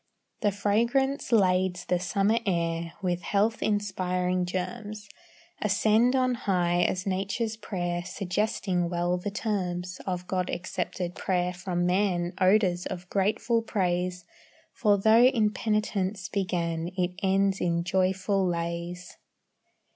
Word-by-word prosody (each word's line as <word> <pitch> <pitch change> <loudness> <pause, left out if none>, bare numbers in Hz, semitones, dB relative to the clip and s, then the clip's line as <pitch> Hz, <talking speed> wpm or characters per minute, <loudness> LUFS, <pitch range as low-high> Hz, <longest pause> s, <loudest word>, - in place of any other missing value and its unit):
The 205 - +2
fragrance 235 +8 +1
lades 185 -4 +2
the 180 - +1
summer 200 +5 +1
air 170 -2 -1
With 180 -1 0
health 210 +5 +1
inspiring 185 -3 0
germs, 205 +3 -5 0.5
Ascend 215 +5 +3
on 255 -1 +2
high 175 -6 +1
as 185 +1 0
nature's 200 +4 -1
prayer, 175 -5 -3
Suggesting 185 -1 -1
well 175 +1 0
the 190 - -3
terms 185 -4 -3
Of 180 -1 -2
God 185 -1 -1
accepted 175 0 -3
prayer 180 -1 -1
from 180 -1 -2
man, 180 -1 +1
Odors 185 -2 +3
of 180 0 -7
grateful 215 +4 +1
praise; 180 -4 -1 0.5
For 210 -4 +3
though 220 +3 +5
in 225 -5 +3
penitence 210 -3 -1
began, 170 -4 -1
It 180 -1 +1
ends 195 0 +2
in 170 -1 +1
joyful 190 +2 +1
lays. 170 +1 -4
185 Hz, 120 wpm, -27 LUFS, 180-210 Hz, 0.5 s, though